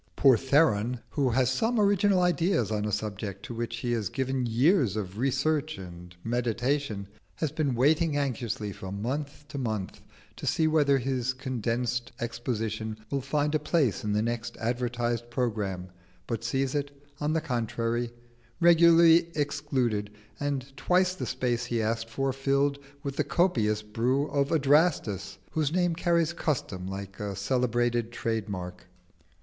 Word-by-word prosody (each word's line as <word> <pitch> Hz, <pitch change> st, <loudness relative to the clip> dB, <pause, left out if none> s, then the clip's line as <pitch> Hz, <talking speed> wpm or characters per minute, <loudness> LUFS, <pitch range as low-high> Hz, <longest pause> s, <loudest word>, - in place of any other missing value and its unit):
Poor 135 Hz, -3 st, +6 dB
Theron, 125 Hz, -3 st, +2 dB
who 140 Hz, -4 st, +1 dB
has 125 Hz, +1 st, +2 dB
some 230 Hz, 0 st, +1 dB
original 200 Hz, -2 st, +4 dB
ideas 170 Hz, -, +2 dB
on 105 Hz, -1 st, 0 dB
a 105 Hz, -, -1 dB
subject 100 Hz, -1 st, -4 dB
to -, -, -6 dB
which 120 Hz, +1 st, -3 dB
he 120 Hz, -, -1 dB
has 110 Hz, -5 st, 0 dB
given 130 Hz, -1 st, -1 dB
years 125 Hz, -, +3 dB
of 100 Hz, -1 st, -4 dB
research 140 Hz, +2 st, 0 dB
and 90 Hz, -2 st, -10 dB
meditation, 120 Hz, -2 st, -1 dB, 0.3 s
has 155 Hz, -4 st, -2 dB
been 145 Hz, -4 st, 0 dB
waiting 150 Hz, +4 st, +3 dB
anxiously 120 Hz, -6 st, -2 dB
from 95 Hz, +1 st, -6 dB
month 145 Hz, +5 st, -4 dB
to 140 Hz, -, -5 dB
month 110 Hz, -6 st, -3 dB, 0.4 s
to -, -, -6 dB
see 160 Hz, -, +2 dB
whether 145 Hz, -3 st, +4 dB
his 130 Hz, -1 st, -1 dB
condensed 120 Hz, -2 st, -2 dB
exposition 115 Hz, -2 st, -3 dB
will 140 Hz, -1 st, 0 dB
find 145 Hz, +3 st, 0 dB
a 155 Hz, -, +3 dB
place 150 Hz, -, +1 dB
in 105 Hz, -, -1 dB
the 105 Hz, +1 st, +2 dB
next 120 Hz, 0 st, -3 dB
advertised 120 Hz, 0 st, -1 dB
programme, 105 Hz, -7 st, -2 dB, 0.4 s
but 115 Hz, +1 st, -3 dB
sees 135 Hz, +3 st, 0 dB
it, 145 Hz, -1 st, -1 dB, 0.3 s
on 150 Hz, +1 st, 0 dB
the 160 Hz, -, +2 dB
contrary, 120 Hz, -4 st, -1 dB, 0.5 s
regularly 170 Hz, -1 st, +6 dB
excluded, 125 Hz, -7 st, 0 dB, 0.3 s
and 140 Hz, -2 st, -3 dB
twice 180 Hz, +6 st, +2 dB
the 185 Hz, -, -5 dB
space 120 Hz, -1 st, -1 dB
he 120 Hz, -1 st, -1 dB
asked 115 Hz, +1 st, -1 dB
for 135 Hz, +3 st, -1 dB
filled 140 Hz, +1 st, +1 dB, 0.2 s
with 140 Hz, -1 st, -4 dB
the 150 Hz, -, +2 dB
copious 120 Hz, -, +1 dB
brew 120 Hz, +6 st, 0 dB
of 140 Hz, -1 st, +1 dB
Adrastus, 145 Hz, -, +2 dB
whose 155 Hz, -2 st, 0 dB
name 175 Hz, 0 st, +2 dB
carries 170 Hz, 0 st, +1 dB
custom 105 Hz, -, -2 dB
like 95 Hz, 0 st, -7 dB
a 100 Hz, -1 st, -3 dB
celebrated 120 Hz, +1 st, 0 dB
trade 115 Hz, -3 st, -2 dB
mark. 90 Hz, -2 st, -6 dB
125 Hz, 150 wpm, -28 LUFS, 110-145 Hz, 0.5 s, Poor